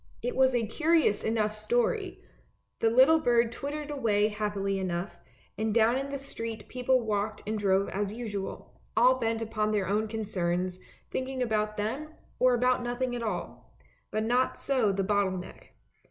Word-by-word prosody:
It 245 - -2
was 260 -1 +4
a 235 -2 +1
curious 310 -1 +2
enough 220 -1 0
story; 215 +3 -1 0.6
the 225 - +3
little 260 +7 +6
bird 240 -5 +3
twittered 295 +4 -5
away 215 -7 +2
happily 205 -2 -2
enough, 180 +1 -3 0.4
and 220 0 0
down 230 +1 +4
in 275 +1 -2
the 280 - -3
street 230 -5 -5
people 255 0 +1
walked 210 -1 -2
and 215 - -2
drove 195 -1 +2
as 205 0 -2
usual, 210 -4 -6 0.2
all 255 +3 +5
bent 225 -1 0
upon 215 -1 -1
their 210 -3 +1
own 210 +3 +1
concerns, 185 -4 -2 0.3
thinking 260 0 -2
about 215 -2 -1
them, 280 +10 -3 0.2
or 255 -1 +5
about 250 +1 +2
nothing 245 +1 -2
at 240 - -4
all; 215 -6 -5 0.3
but 215 0 -1
not 245 +3 +1
so 255 -7 +1
the 195 0 -1
bottle 195 -1 +1
neck. 180 - -11
225 Hz, 165 wpm, -29 LUFS, 205-250 Hz, 0.6 s, little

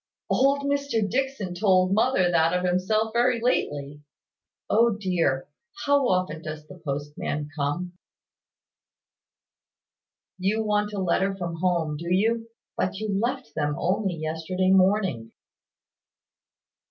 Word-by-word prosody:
"Old 275 +2 +3
Mr 280 -6 0
Dixon 265 -5 -2
told 185 0 +3
mother 210 -5 +3
that 165 +1 +3
of 180 - -2
himself, 215 +5 +1
very 240 0 +2
lately. 145 - -1 0.7
Oh 230 0 +3
dear, 170 -9 0 0.4
how 285 -2 +3
often 185 -5 0
does 155 -1 -7
the 180 +3 -13
postman 145 0 -4
come?" 160 +5 -2 2.5
"You 210 +4 +1
want 210 -1 0
a 205 - -5
letter 190 +1 +1
from 170 -3 -4
home, 170 -4 0
do 170 +3 -5
you? 225 +4 +1 0.3
But 185 +1 -1
you 215 +1 -4
left 245 +6 -2
them 150 -1 -1
only 190 0 0
yesterday 165 +4 -1
morning." 185 - +2
185 Hz, 115 wpm, -25 LUFS, 165-220 Hz, 2.5 s, Old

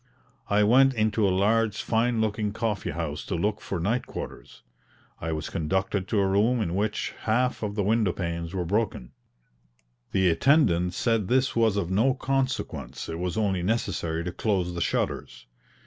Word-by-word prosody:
I 105 +1 +4
went 130 +5 +5
into 110 -1 +2
a - - +3
large 105 +3 +2
fine 115 0 +1
looking 105 -1 -1
coffee 110 -2 -2
house 75 -1 -4
to 95 - -3
look 105 +5 -1
for 95 - -4
night 110 +9 -1
quarters. - - -8 0.6
I 80 - -3
was 80 -1 -4
conducted 95 +4 -1
to 105 - +1
a 100 - +3
room 105 +6 +2
in 90 -6 -1
which 105 +2 -1
half 125 +3 +1
of 105 -2 -3
the 105 - 0
window 105 -1 +2
panes 85 -2 -4
were 90 -2 -2
broken. 100 - -1 1.0
The 95 -2 +3
attendant 90 - +3
said 115 -4 +1
this 130 +3 +2
was 115 -3 +3
of 95 -3 -1
no 120 +7 +3
consequence, 135 -7 -2
it 80 0 -4
was 90 +1 -2
only 100 -4 +1
necessary 90 -5 -1
to 90 - -3
close 95 -3 -1
the 85 - -4
shutters. 60 -6 -2
100 Hz, 170 wpm, -26 LUFS, 90-115 Hz, 1.0 s, went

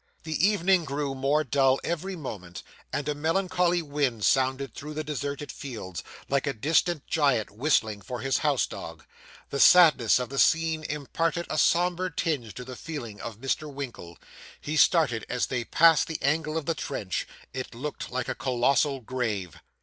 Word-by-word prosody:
The 160 +3 +2
evening 190 -3 +3
grew 140 -2 -3
more 140 +3 +1
dull 135 0 +3
every 175 +3 -3
moment, 100 - -7 0.3
and 145 0 -3
a 150 - +1
melancholy 175 +2 +1
wind 140 -7 -1
sounded 130 -1 +1
through 150 +1 -8
the 155 - -2
deserted 145 0 -4
fields, 110 -10 -7 0.2
like 140 0 0
a 140 - 0
distant 155 +5 +1
giant 140 -10 +1
whistling 110 -3 +1
for 125 +5 -6
his 135 0 +1
house 145 -4 +2
dog. - - -9 0.5
The 140 - -2
sadness 155 -10 +7
of 125 -2 -3
the 135 0 -3
scene 160 -1 +3
imparted 165 +4 -2
a - - -1
sombre 180 +3 +2
tinge 140 - -2
to 125 - -7
the 130 0 -8
feelings 120 -9 -7
of 115 -3 -6
Mr. 135 +4 -2
Winkle. 120 -11 -7 0.4
He 150 - -4
started 150 - +3
as 125 - 0
they 125 -2 -3
passed 165 +2 +5
the 160 - -3
angle 155 +2 +1
of 160 - -3
the 165 - +1
trench 105 - -4 0.3
it 130 -2 -6
looked 145 +5 -5
like 125 -1 -3
a - - -1
colossal 135 +2 +1
grave. 105 -9 -3
140 Hz, 170 wpm, -27 LUFS, 125-160 Hz, 0.5 s, sadness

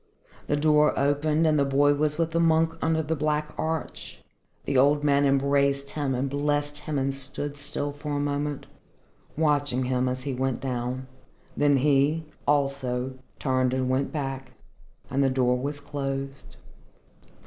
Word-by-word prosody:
The 145 - +1
door 150 0 +3
opened 150 +3 +2
and 155 -2 +3
the - - +4
boy 140 +1 +3
was 150 +1 0
with 165 -1 0
the 165 - +1
monk 165 0 +3
under 160 0 +1
the 160 +2 -1
black 150 0 -1
arch. 160 -1 -4 0.5
The 140 - -1
old 145 +3 +4
man 140 -1 +3
embraced 140 0 +2
him 140 -3 -1
and 130 +2 -1
blessed 145 +1 -1
him 150 0 -3
and 135 0 0
stood 140 +2 -5
still 145 0 -3
for 145 +1 -6
a 145 - 0
moment 145 0 -2 0.7
watching 145 -4 +1
him 125 0 +1
as 130 0 -3
he 140 - -3
went 130 0 -1
down. 125 0 -3 0.5
Then 145 -1 +3
he, 145 +3 +2 0.2
also, 130 -3 0 0.2
turned 130 -1 +1
and 130 -1 0
went 135 +2 0
back, 135 -3 -4 0.6
and 135 +2 +2
the 135 - +3
door 125 -1 +2
was 140 +3 -3
closed. 140 -1 -5
140 Hz, 160 wpm, -26 LUFS, 135-150 Hz, 0.7 s, the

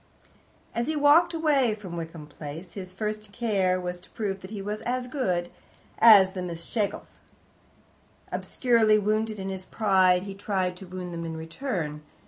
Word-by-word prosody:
As 235 +2 -1
he 315 - 0
walked 300 +4 +5
away 290 -9 +2
from 190 -5 -8
Wickham 165 -2 -6
Place, 150 +4 -9
his 185 -2 -7
first 210 +1 -4
care 195 -5 +1
was 180 0 -4
to 180 - -18
prove 195 -3 -3
that 185 - -9
he 210 -1 -6
was 210 +2 -4
as 250 +1 -2
good 185 -10 -1 0.5
as 205 -4 +8
the 190 -1 -5
Miss 170 -2 -6
Schlegels. 210 -4 -3 1.1
Obscurely 230 -4 +3
wounded 215 +1 0
in 195 -1 -4
his 190 -1 -4
pride, 185 -4 +3
he 200 0 -6
tried 190 -2 -1
to 190 - -10
wound 180 -1 -6
them 170 0 -4
in 165 -1 -5
return. 160 - -4
195 Hz, 165 wpm, -27 LUFS, 180-220 Hz, 1.1 s, as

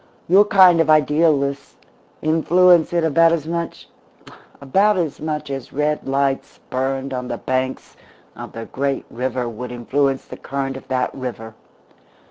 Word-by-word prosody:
Your 195 +4 +6
kind 185 -4 +6
of 165 - 0
idealists 150 -2 +2 0.5
influence 170 +2 +4
it 170 -1 +1
about 165 +1 +4
as 165 -3 -1
much 170 +1 -5 0.7
about 195 +9 +2
as 165 -5 -2
much 150 -1 -4
as 135 -2 -6
red 150 +1 -1
lights 135 0 -1
burned 135 +1 -2
on 125 -1 -4
the - - -4
banks 130 0 -3 0.4
of - - -9
the 115 0 -7
great 135 +2 -3
river 125 0 -3
would 120 +2 -7
influence 135 +3 -1
the - - -10
current 135 -1 -4
of 135 - -10
that 130 -1 -1
river. 120 -4 -7
140 Hz, 145 wpm, -20 LUFS, 130-165 Hz, 0.7 s, Your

